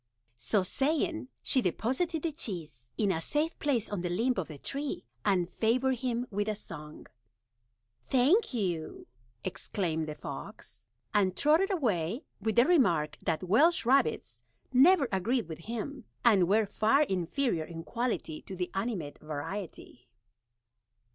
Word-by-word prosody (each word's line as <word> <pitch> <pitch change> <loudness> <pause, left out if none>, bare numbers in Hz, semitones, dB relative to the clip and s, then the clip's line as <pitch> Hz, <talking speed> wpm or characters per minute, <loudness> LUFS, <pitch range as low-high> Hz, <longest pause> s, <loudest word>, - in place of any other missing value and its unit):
So 125 - +1
saying, 310 - 0 0.2
she 260 - +3
deposited 265 - -1
the 330 - 0
Cheese 160 - -5
in 205 -3 +2
a 165 - -1
safe 300 - -1
Place 255 -7 +1
on 205 -4 -3
the 175 - -2
Limb 230 +9 +1
of 185 - -1
the 155 - -9
Tree, 280 - -4 0.2
and 180 -3 +2
favored 245 +6 +1
him 245 -1 -1
with 205 +1 -1
a 215 - 0
Song. 150 -6 -9 1.0
"Thank 280 - +4
you," 180 - -3 0.4
exclaimed 160 -6 -2
the 150 - -5
Fox, - - -8 0.3
and 190 -3 +2
trotted 320 +7 +4
away, 225 - 0 0.2
with 220 -1 0
the 240 +1 +6
Remark 175 - +3
that 165 +2 -1
Welsh 235 - +4
Rabbits 270 +3 +2 0.3
never 285 +3 +6
agreed 215 +3 0
with 160 -1 -7
him, 235 +3 -5 0.2
and 200 -7 +6
were 215 +2 +4
far 220 +8 +3
inferior 190 - -1
in 165 0 -8
Quality 230 -10 -2
to 190 - -8
the 180 -1 -3
animate 195 -7 -3
Variety. 155 - -7
215 Hz, 140 wpm, -30 LUFS, 175-265 Hz, 1.0 s, the